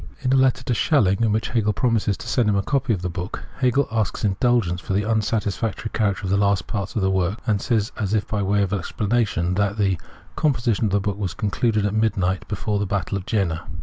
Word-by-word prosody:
In 130 -1 +1
a - - +5
letter 130 -1 +3
to 125 - -1
Schelling, 110 - +2
in 115 -2 +3
which 110 +1 0
Hegel 110 -3 +1
promises 110 -3 +1
to - - -9
send 120 -4 +2
him 105 - +2
a 100 - +1
copy 135 0 0
of 95 -5 -1
the - - 0
book,* 90 +3 -5 0.2
Hegel 130 +2 +2
asks 110 -2 -1
indulgence 100 -3 +1
for - - -3
the 100 +2 +1
unsatisfactory 110 0 -1
character 105 -3 0
of 95 - -2
the 100 - +3
last 100 -1 +2
parts 100 -4 -4
of 105 - 0
the 95 - +2
work, 95 +2 0
and 105 -4 +1
says, 115 -3 0
as 105 -1 0
if 105 - 0
by 105 -2 -1
way 100 +1 +2
of 100 0 -2
explanation, 105 -2 0
that 100 +2 0
the 95 -4 +1 0.2
" - - -26
composition 120 -7 +1
of 105 - 0
the 100 - +3
book 100 0 -3
was 95 -5 -3
concluded 105 +1 0
at 105 - 0
midnight 95 -4 0
before 105 0 -2
the 100 - -1
battle 100 0 -2
of 95 -1 -5
Jena." 90 -8 -1
105 Hz, 240 wpm, -23 LUFS, 95-115 Hz, 0.2 s, a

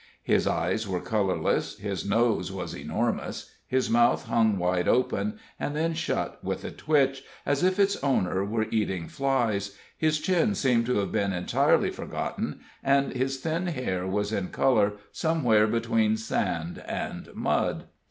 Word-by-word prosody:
His - - +2
eyes - - 0
were 90 -2 -1
colorless, 100 -1 0
his 100 -2 -3
nose 115 +3 +1
was - - -5
enormous, - - -3 0.2
his 130 0 +1
mouth 120 +1 +3
hung 110 -3 +2
wide 90 0 0
open 210 - +1 0.2
and 145 - -2
then 165 +2 0
shut 165 - -2
with - - -3
a - - -4
twitch, 135 -3 +1 0.2
as 140 0 +1
if 185 +1 +3
its 200 0 +3
owner 95 -9 +1
were 110 +2 0
eating 95 -6 -1
flies, 115 -8 0 0.2
his 155 -1 +1
chin 190 +5 +2
seemed 120 -6 +2
to 125 - +1
have 100 - -1
been 100 -3 0
entirely 90 0 +2
forgotten, - - -4 0.2
and 140 0 +2
his 135 +1 -1
thin 165 +5 -2
hair 95 - -2
was 105 +2 -1
in 95 -3 -1
color 105 -4 +2 0.2
somewhere 125 -11 +3
between 110 -1 +1
sand 90 -6 -2
and - - -4
mud. - - 0
115 Hz, 150 wpm, -27 LUFS, 100-140 Hz, 0.2 s, mouth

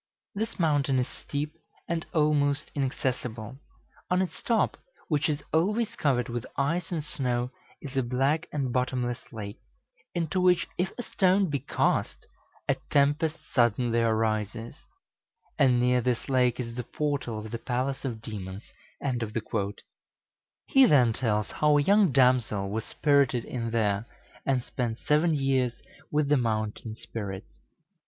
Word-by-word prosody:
This 220 +3 -3
mountain 145 -5 +2
is 125 - +1
steep, 150 +1 -4 0.3
and 170 -1 -2
almost 145 -2 +2
inaccessible. 125 -3 -3 0.5
On 180 - +3
its 190 -1 -2
top, 230 -2 +2 0.3
which 150 -1 +2
is 145 -1 -2
always 210 +8 +1
covered 125 -5 +1
with 120 -1 -3
ice 165 +6 0
and 160 -4 -1
snow, 125 -4 -1 0.3
is 135 -1 -7
a 135 - +3
black 135 +7 +1
and 135 -5 -1
bottomless 125 -1 -1
lake, 105 0 -7 0.6
into 175 +2 0
which 180 -1 +4
if 180 +2 -1
a 245 - -3
stone 190 -4 +2
be 140 - 0
cast, 130 - 0 0.4
a - - +2
tempest 145 +3 +2 0.2
suddenly 120 -1 +3
arises; 110 +1 0 0.8
and 130 -4 +5
near 125 0 +3
this 120 0 -1
lake 125 -2 +3
is 115 -2 -4
the 125 - -3
portal 140 -4 -2
of 110 0 -7
the 115 - -3
palace 130 +2 -2
of 115 -5 -4
demons." 100 -3 -7 1.9
He 270 -1 +6
then 125 - +5
tells 105 -4 0
how 150 -1 +3
a 145 - +3
young 200 -1 +5
damsel 125 -7 +3
was 110 +1 -2
spirited 140 -5 +2
in 115 -2 -3
there, 110 -1 0 0.4
and 130 -3 +2
spent 120 -3 -3
seven 155 +4 +2
years 130 -4 +1 0.3
with 150 -1 +1
the 145 0 +4
mountain 110 -2 -2
spirits. 100 -3 -7
130 Hz, 140 wpm, -28 LUFS, 115-150 Hz, 1.9 s, He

